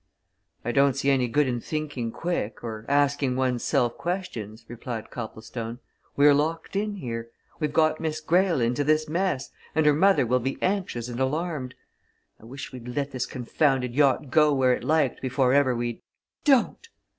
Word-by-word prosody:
"I 120 - 0
don't 140 0 +3
see 140 0 +1
any 130 -2 +2
good 145 +4 +2
in 120 -2 -2
thinking 145 -7 -3
quick, 145 -9 -3
or 110 -2 -6
asking 140 -2 +2
one's 125 -2 0
self 120 -1 +1
questions," 120 - -4
replied 120 -1 -6
Copplestone. 115 0 -6 0.4
"We're 145 +1 +7
locked 160 +5 -1
in 205 +1 -1
here. 115 -9 -5 0.3
We've 150 -2 -1
got 155 0 +2
Miss 155 -1 -2
Greyle 175 +1 +2
into 120 +5 +1
this 155 +1 +2
mess 165 -4 -1 0.2
and 160 -1 +3
her 150 - +6
mother 190 -2 +4
will 125 +2 +2
be 135 +2 -3
anxious 185 - -1
and 120 0 -6
alarmed. 145 -1 -2 0.6
I - - -16
wish 135 +3 -8
we'd 125 -2 -9
let 140 +3 -2
this 130 -2 -3
confounded 125 0 0
yacht 140 -1 +2
go 150 0 +5
where 130 -1 +4
it - - -3
liked 155 -5 +1
before 130 0 +1
ever 140 -3 +3
we'd 120 -1 -3 0.3
" - - -55
"Don't!" 285 - +2
135 Hz, 175 wpm, -26 LUFS, 120-155 Hz, 0.6 s, We're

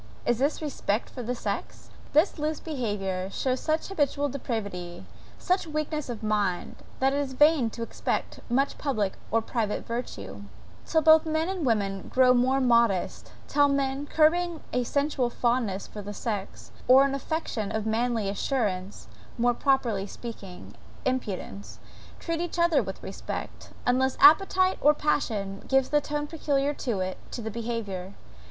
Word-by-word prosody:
Is 240 -1 +1
this 290 +4 0
respect 235 -7 -2
for 255 - -6
the 245 +1 -2
sex? - - -5 0.2
This 315 +2 +3
loose 305 +1 -1
behaviour 205 - -3
shows 255 +5 -1
such 315 +2 -1
habitual 290 -5 0
depravity, 200 -10 -5 0.3
such 365 -2 0
weakness 305 -2 -3
of 230 -2 -5
mind, 210 -4 -1 0.2
that 270 +1 +3
it 285 - +1
is 275 -2 -2
vain 295 -3 +4
to 230 +1 -6
expect - - -3
much 270 +4 +1
public 215 -9 0 0.2
or 225 0 +1
private 220 -3 -2
virtue, 235 +2 -5 0.5
till 320 -1 +2
both 315 +1 +7
men 315 +1 0
and 365 -7 -2
women 195 -4 0
grow 255 -1 +5
more 255 +2 +3
modest 235 -7 +2 0.2
till 290 0 +4
men, 275 0 -1
curbing 335 +2 +2
a 250 - +1
sensual 280 -2 0
fondness 235 -5 0
for 210 - -8
the 205 +1 -7
sex, 205 -4 -5 0.2
or 260 +2 +8
an 275 - -1
affectation 275 -7 -3
of 220 -1 -2
manly 225 -1 0
assurance, 200 - -2 0.3
more 245 +1 +3
properly 235 -7 +1
speaking, 200 -4 -9 0.3
impudence, 205 -5 -3 0.4
treat 335 -1 -2
each 345 0 -4
other 340 -1 +4
with - - -7
respect - - -6 0.2
unless 255 +1 +2
appetite 370 +5 +6
or 300 +1 +5
passion 210 -10 -1
gives 270 -1 +3
the 295 0 +3
tone, 295 +1 -3
peculiar 290 -2 0
to 235 -9 -2
it, 185 0 -3
to - - -6
their 220 -1 -4
behaviour. 205 -5 -4
255 Hz, 155 wpm, -27 LUFS, 215-295 Hz, 0.5 s, or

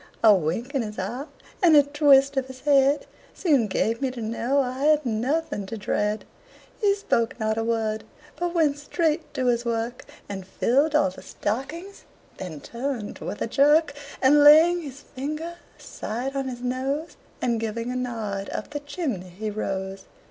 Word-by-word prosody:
A 220 -2 +9
wink 190 - -1
of 275 - +1
his 215 -2 -6
eye 245 +10 -4 0.3
and 340 -4 +6
a 290 - +8
twist 280 -1 +4
of 265 -1 0
his 260 -1 -11
head 280 0 +3 0.3
Soon 285 - +2
gave 225 +4 0
me 270 - +1
to 250 -1 -8
know 230 +5 0
I 260 +1 -1
had 305 -1 +4
nothing 240 -1 -1
to 225 - -5
dread. 210 +1 -1 0.6
He 400 -2 +4
spoke 245 - 0
not 220 0 0
a 225 - -1
word, 220 -1 -1 0.3
but 350 0 -3
went 295 -4 +2
straight 315 +1 -1
to 255 - -1
his 240 -1 +2
work, 235 +1 -2 0.2
And 195 -2 -5
filled 280 +10 +2
all 190 -11 +3
the 185 - -12
stockings; 315 - -5 0.3
then 160 -6 -7
turned 240 -3 -4
with 205 - -4
a - - 0
jerk, 290 +4 +4 0.3
And 290 +2 +6
laying 325 +4 +7
his 285 -2 -9
finger 305 +5 -5 0.2
aside 250 +5 -5
of 270 -1 -1
his 245 -2 -6
nose, 265 +5 -2 0.2
And 235 -2 0
giving 230 +2 -3
a - - -4
nod, 220 -6 -3
up - - -5
the 295 - -3
chimney 285 - -4
he 210 +4 -5
rose. 195 -2 -4
255 Hz, 175 wpm, -25 LUFS, 220-290 Hz, 0.6 s, A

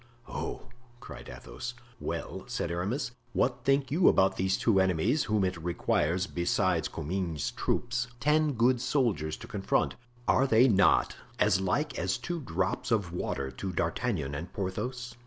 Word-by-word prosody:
"Oh!" - - -5 0.3
cried - - -10
Athos. - - -7 0.2
"Well," - - -4
said 85 - -2
Aramis, 100 +10 -2 0.2
"what 125 -1 +1
think 135 0 +2
you 170 +5 +4
about 95 0 +5
these 95 +1 +1
two 105 -5 +3
enemies 95 - +2
whom 105 -2 +1
it 90 0 -1
requires, 85 +1 +1
besides 90 -1 +1
Comminges's 85 -1 -2
troop, 120 0 -2 0.3
ten 150 +2 +3
good 120 +1 +3
soldiers 120 - 0
to - - -10
confront; - - 0 0.3
are 135 - +4
they 120 +1 +6
not 100 -5 +4 0.2
as 105 -4 +3
like 145 +11 0
as - - 0
two 175 -1 -4
drops 95 - -2
of 100 -7 0
water 70 -6 -2
to 95 +6 -5
D'Artagnan 85 - -1
and 85 +5 -5
Porthos?" 120 +6 -4
95 Hz, 150 wpm, -29 LUFS, 85-125 Hz, 0.3 s, they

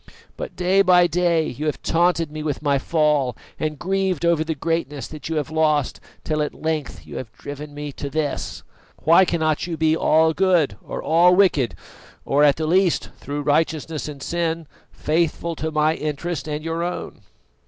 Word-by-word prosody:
But - - -7
day 185 +2 +3
by 180 -2 +5
day 170 -2 +1
you 150 +5 -4
have 150 - -3
taunted 165 -2 +2
me 155 0 -5
with 150 -1 -3
my 140 -2 +2
fall 150 -5 +1 0.2
and 155 -1 -2
grieved 190 -1 -1
over 170 -2 +3
the 160 0 -3
greatness 150 -2 -2
that 155 0 -8
you 165 - -2
have 150 -1 -2
lost, 155 -3 +1 0.2
till 155 -1 -1
at 150 - -2
length 155 -3 -3
you - - -8
have 115 -4 -6
driven 145 +1 -8
me 145 0 -5
to 140 +1 -6
this. 150 -1 -3 0.4
Why 170 +4 +6
cannot 160 -2 0
you 165 -2 -4
be 160 0 +3
all 160 0 +3
good 180 -5 +2
or - - -6
all 175 +3 +5
wicked, 170 - +3 0.5
or 145 +2 +3
at 145 -2 +5
the 160 - -2
least, 180 +2 +2
through 145 +1 -4
righteousness 155 +1 0
and 140 -3 -8
sin, 165 -1 -2 0.3
faithful 165 +1 -1
to 160 - -2
my 155 0 +2
interest 155 +1 -4
and 150 0 -3
your 165 +1 -2
own?" 175 -9 -4
155 Hz, 180 wpm, -22 LUFS, 150-170 Hz, 0.5 s, Why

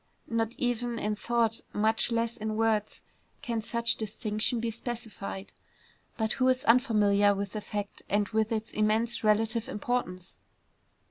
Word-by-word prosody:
Not 230 0 0
even 245 -1 -1
in 210 -1 -1
thought, 230 0 0
much 220 +3 +1
less 230 0 0
in 215 -2 -3
words, 220 -1 0 0.4
can 235 -5 -1
such 235 +1 +1
distinction 215 +1 -1
be 230 0 -1
specified; 225 -4 -6 0.6
but 220 -1 0
who 255 - +2
is 255 0 +2
unfamiliar 210 -4 +4
with 200 -1 -3
the 215 - -3
fact 205 -1 -5
and 205 0 +2
with 220 0 0
its 220 -1 -2
immense 220 +3 +3
relative 220 +2 +2
importance? 195 -5 -3
220 Hz, 140 wpm, -29 LUFS, 210-235 Hz, 0.6 s, unfamiliar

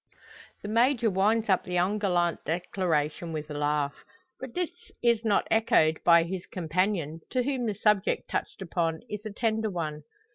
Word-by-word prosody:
The - - -5
Major 235 +1 +3
winds 215 +4 +2
up 190 -3 +3
the 180 - -4
ungallant 180 -2 +1
declaration 165 -1 -1
with 155 -1 -5
a - - -3
laugh. 145 -1 -1 0.4
But 260 -2 -8
this 355 -2 -1 0.3
is 235 -2 +3
not 210 -3 +2
echoed 160 -8 +3
by 170 -1 +6
his 180 +1 -5
companion, 170 -2 -1
to 255 -1 0
whom 260 -3 -1
the 210 - -1
subject 210 -1 +1
touched 195 - -3
upon 165 -2 -1
is 210 +1 -5
a - - -6
tender 220 0 0
one. 155 -5 -4
190 Hz, 160 wpm, -28 LUFS, 165-220 Hz, 0.4 s, by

